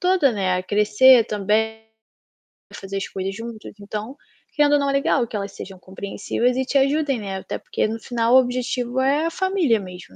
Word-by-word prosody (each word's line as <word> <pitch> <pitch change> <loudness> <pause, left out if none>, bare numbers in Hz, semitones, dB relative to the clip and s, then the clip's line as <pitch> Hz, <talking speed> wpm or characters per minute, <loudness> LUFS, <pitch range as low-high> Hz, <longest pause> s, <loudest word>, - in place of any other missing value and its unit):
toda, 360 -7 +3
né, 185 -3 0
a 185 - -2
crescer 210 +5 +5
também, 220 +2 -1 0.9
a - - -12
fazer 195 0 -6
as 195 - -3
coisas 190 0 -5
juntos. 230 0 -8
Então 210 +5 -6 0.4
querendo 295 -1 +3
ou 290 - +4
não, 280 0 0
é - - 0
legal 275 -2 +1
que 220 - -8
elas 200 -1 -4
sejam 195 -1 -10
compreensivas 200 +6 -3
e 265 - 0
te 275 - 0
ajudem, 275 -1 +1
né, 195 -2 -5
até - - -5
porque - - -2
no 225 +1 -4
final, 235 +1 0
o 260 - +9
objetivo 250 0 -2
é 285 +4 +2
a 330 - -1
família 370 - +1
mesmo, 180 - -11
230 Hz, 200 wpm, -22 LUFS, 200-270 Hz, 0.9 s, o